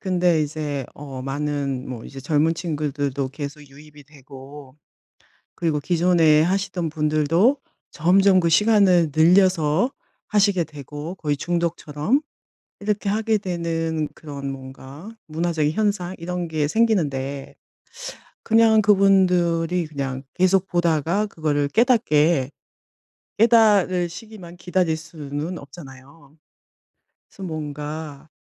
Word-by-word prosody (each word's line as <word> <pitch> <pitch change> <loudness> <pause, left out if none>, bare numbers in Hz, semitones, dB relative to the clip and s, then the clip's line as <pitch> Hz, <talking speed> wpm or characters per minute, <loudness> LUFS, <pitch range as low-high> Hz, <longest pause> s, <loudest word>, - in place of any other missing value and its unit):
근데 180 -4 +1
이제 145 -2 -4
어 135 -3 -8
많은 140 -1 -3
뭐 120 -3 -7
이제 135 - -9
젊은 155 +3 +1
친구들도 145 -5 -3
계속 145 +2 -7
유입이 145 +1 -16
되고 140 -1 -13 0.8
그리고 160 -4 -1
기존에 165 -2 +3
하시던 180 -1 -1
분들도 155 - +2 0.3
점점 185 +3 +4
그 170 - +1
시간을 185 -4 +4
늘려서 180 - +3 0.4
하시게 200 -4 +2
되고 150 +3 -8
거의 150 -5 -2
중독처럼 170 - -1 0.6
이렇게 210 0 -2
하게 220 +1 +1
되는 165 -4 -2
그런 140 -3 -7
뭔가 135 +6 -10 0.2
문화적인 160 -1 -1
현상 200 -3 -1
이런 175 0 -4
게 155 -2 -1
생기는데 145 -10 -1 0.9
그냥 225 -1 +4
그분들이 180 -4 +3
그냥 135 -3 -5
계속 185 +1 +2
보다가 175 +3 0
그거를 145 -5 -1
깨닫게 160 - +2 0.9
깨닫으시기만 205 -4 +2
기다릴 175 -2 0
수는 155 +1 -6
없잖아요. 140 0 -14 0.9
그래서 195 - -12
뭔가, 150 -1 -6
160 Hz, 250 characters per minute, -22 LUFS, 145-185 Hz, 0.9 s, 점점